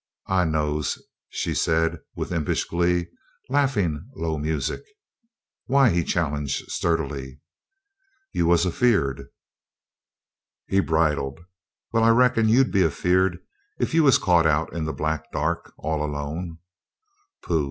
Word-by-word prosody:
"I 95 -2 +3
knows," 75 -2 -1 0.3
she - - -2
said, 80 0 +1 0.2
with - - -4
impish 80 -4 -1
glee, 85 0 +1 0.4
laughing 110 - 0
low 80 -2 -2
music. 75 0 -2 0.9
"Why?" 135 -2 +4
he 85 0 +1
challenged, 75 -5 -2
sturdily. 70 -5 -2 0.9
"You 85 - 0
was 85 +1 +4
a 90 - 0
feared." 90 - +1 1.4
He 95 - +2
bridled. 80 -5 0 0.5
"Well, 115 -1 +3
I 115 - +5
reckon 115 -1 +4
you'd 130 +4 +4
be 100 - +3
a 85 - +4
feared 90 +4 +1 0.4
if - - -1
you 165 - +5
was 135 -4 +6
caught 85 -4 +3
out 80 +1 0
in 80 -2 -3
the 80 - -2
black 80 0 -3
dark 80 +3 -2
all 80 -1 -2
alone." 75 +3 -4 0.9
"Pooh!" 85 -2 +1
80 Hz, 130 wpm, -24 LUFS, 75-95 Hz, 1.4 s, was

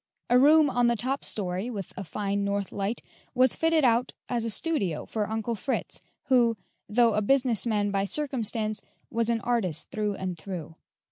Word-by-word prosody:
A 245 - +7
room 300 +1 +6
in 245 -1 +4
the 235 - +2
top 260 +5 -2
story, 190 +2 -2
with 200 -7 -6
a 195 - -5
fine 200 +2 -2
north 200 -1 -2
light, 200 +3 -3 0.3
was 255 -1 +4
fitted 325 -3 +2
up 240 +1 +2 0.2
as 235 -2 -1
a - - -1
studio 215 - -1
for 210 -2 -3
Uncle 220 +1 -2
Fritz, 255 +5 -3 0.2
who, 240 -3 +3 0.3
though 230 +1 +4
a 210 - +1
business 250 0 +2
man 205 -2 +1
by 195 0 0
circumstance, 225 -5 -1 0.3
was 230 0 0
an 230 -1 +1
artist 195 -10 -1
through 210 -1 -1
and 185 -2 -4
through. 165 -3 -6
225 Hz, 180 wpm, -27 LUFS, 200-245 Hz, 0.3 s, A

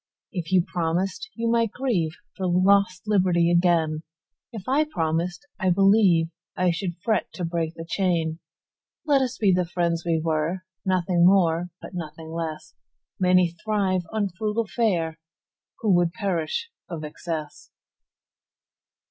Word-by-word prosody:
If 175 -7 -4
you 185 -2 +5
promised, 180 - -2
you 230 0 -2
might 230 -1 +2
grieveFor 200 -12 +1 0.3
lost 185 0 +3
liberty 180 -5 +3
again:If 165 +4 -1
I 275 +4 +3
promised, 175 - -2
I 190 - +2
believeI 180 -2 +3
should 175 0 -4
fret 220 -2 0
to 180 - -3
break 165 -1 -2
the 165 - -7
chain. 170 -4 0 0.7
Let 285 -3 +4
us 255 -1 -2
be 200 -4 +3
the 180 0 +2
friends 170 -1 -1
we 165 -2 +1
were, 160 +3 -1 0.2
Nothing 180 -2 +2
more 175 -2 +4
but - - -9
nothing 160 -2 -7
less:Many 170 +2 -1
thrive 200 -4 +1
on 210 -2 0
frugal 215 +4 -2
fareWho 185 -8 0 0.7
would 175 -5 +3
perish 195 - -2 0.2
of 165 -3 -5
excess. 155 0 -6
180 Hz, 120 wpm, -25 LUFS, 165-200 Hz, 0.7 s, you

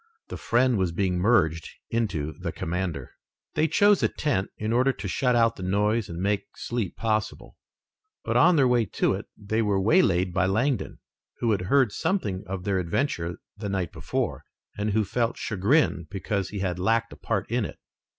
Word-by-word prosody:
The - - -5
friend 120 -1 +2
was 90 -2 +1
being 90 0 0
merged 85 -6 +2 0.2
into 90 -10 -1
the - - -3
commander. 85 -5 -3 0.4
They 155 - +2
chose 205 +3 +4
a - - +4
tent 120 -11 -1
in 110 +1 -2
order 130 +3 +3
to 105 -5 -6
shut 125 +6 +1
out 115 -1 +3
the - - -8
noise 105 +4 +1
and 85 0 -6
make 100 +2 -2
sleep 120 -6 -3
possible, 110 -1 -2 0.7
but - - -2
on 180 - +6
their 135 -4 +4
way 120 -2 +3
to - - 0
it - - -5
they 110 +3 -1
were 105 -3 +1
waylaid 95 - +3
by 90 0 +2
Langdon, 115 +4 0 0.4
who 115 - +1
had 100 -3 +1
heard 135 -6 +4
something 100 - -1
of 95 -1 -4
their 95 -1 0
adventure 85 - -1 0.2
the 105 - -5
night 95 -3 -2
before, - - -3 0.3
and 105 +1 -1
who 110 0 +3
felt 115 +3 -1
chagrin 110 - +1
because 95 0 -2
he 100 -2 -5
had 90 -2 -2
lacked 115 +4 +1
a - - -10
part 110 -4 -2
in 120 -1 +1
it. - - -6
105 Hz, 185 wpm, -26 LUFS, 95-120 Hz, 0.7 s, on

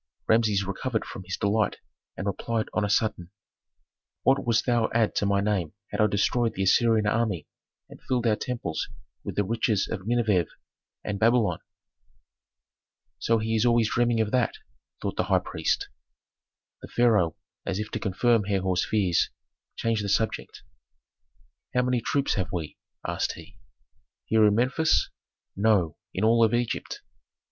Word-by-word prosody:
Rameses 110 -3 +3
recovered 110 +4 -2
from 95 - -8
his 95 - -4
delight 100 0 +1 0.4
and 95 - -4
replied 110 +3 -2
on 105 - +1
a 105 - 0
sudden, 105 -5 0 0.9
"What 135 +1 +3
wouldst 115 -1 +1
thou 120 -3 +2
add 115 -2 +3
to 100 - +1
my 100 0 +2
name 100 -6 -1 0.2
had - - 0
I 105 - +5
destroyed 115 +3 +1
the 95 - -1
Assyrian 110 +2 +3
army 105 -7 0 0.4
and - - -14
filled 125 -2 -1
our 110 -2 +3
temples 120 - -3 0.4
with - - -5
the 105 - +2
riches 110 -1 0
of 100 -2 -5
Nineveh 110 -8 +2 0.6
and 100 -1 -3
Babylon?" 115 0 +3 1.6
"So 115 - +2
he 110 +1 -1
is 110 - +2
always 120 -2 +3
dreaming 120 -1 +2
of 105 -1 -1
that?" 125 -3 +1 0.5
thought - - -3
the - - +1
high - - +3
priest. - - -1 0.9
The - - -9
pharaoh, 105 -9 +2 0.3
as 95 -1 -2
if 105 +1 -4
to - - -3
confirm 110 +2 +2
Herhor's 95 -2 0
fears, 95 -6 +1 0.5
changed 115 -2 -1
the 100 - -3
subject. 110 +3 -1 1.1
"How 125 - +3
many 125 -1 +1
troops 140 +3 0
have 95 -3 -2
we?" 80 -4 -4 0.3
asked - - -1
he. - - -13 0.7
"Here 110 -1 +4
in 105 - +3
Memphis?" 130 +7 +2 0.4
"No, 100 -6 +2 0.2
in 95 - -3
all 115 0 +4
Egypt." 120 -1 -3
110 Hz, 155 wpm, -26 LUFS, 100-115 Hz, 1.6 s, I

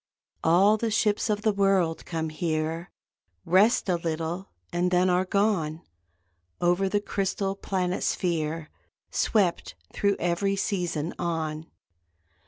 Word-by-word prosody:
All 190 +6 +5
the 230 +1 -1
ships 215 0 +1
of 210 0 0
the 215 - +3
world 195 -5 +1
come 160 -1 -2
here, 160 +1 -2 0.6
Rest 200 +8 +4
a 180 -2 +2
little 165 +3 -3 0.2
and 175 +1 +1
then 180 0 +3
are 180 +1 +2
gone, 185 -6 0 0.8
Over 175 +2 +2
the 205 - +1
crystal 195 -1 -2
planet 185 -2 -2
sphere 165 -2 -1 0.4
Swept, 195 -6 +1 0.2
thro 200 -1 +1
every 175 +3 0
season, 175 -5 -2
on. 160 -2 -2
180 Hz, 120 wpm, -27 LUFS, 165-195 Hz, 0.8 s, All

